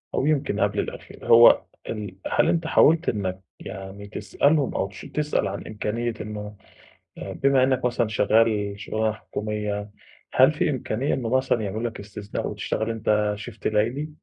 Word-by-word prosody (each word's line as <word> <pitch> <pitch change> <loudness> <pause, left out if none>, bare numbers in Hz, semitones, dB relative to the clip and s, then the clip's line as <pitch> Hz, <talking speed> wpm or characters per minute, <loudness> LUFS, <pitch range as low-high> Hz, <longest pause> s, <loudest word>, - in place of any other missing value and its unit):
أو - - +1
يمكن 150 -2 +1
قبْل - - +1
الأخير. - - -6
هو 115 +1 +8 0.3
ال 105 -4 -5 0.2
هل - - +3
أنت 165 -1 0
حاولت 165 +2 +4
إنك 95 -3 -2 0.2
يعني 95 +1 -8
تسألهم 145 +6 +1
أو 95 - 0
تـش 95 -1 -12
تسأل 150 0 -1
عن 100 - -5
إمكانية 115 +3 -2
إنه 105 -1 -6 0.6
آآ - - -6
بما 135 -1 +3
إنك 130 -1 +1
مثلًا 120 -1 +1
شغّال 110 -1 +2
شُغلانة 110 0 -1
حكومية، 105 -1 -4 0.4
هل 130 +3 +6
فيه 170 +1 0
إمكانية 130 -1 -1
إنه 120 -4 -2
مثلًا 130 -3 +1
يعملوا 110 +4 -2
لك 110 - -11
استثناء 105 0 -5
وتشتغل 110 +1 -2
أنت 105 -2 +1
shift 105 - -5
ليلي، 120 +8 0
110 Hz, 155 wpm, -24 LUFS, 105-130 Hz, 0.6 s, هو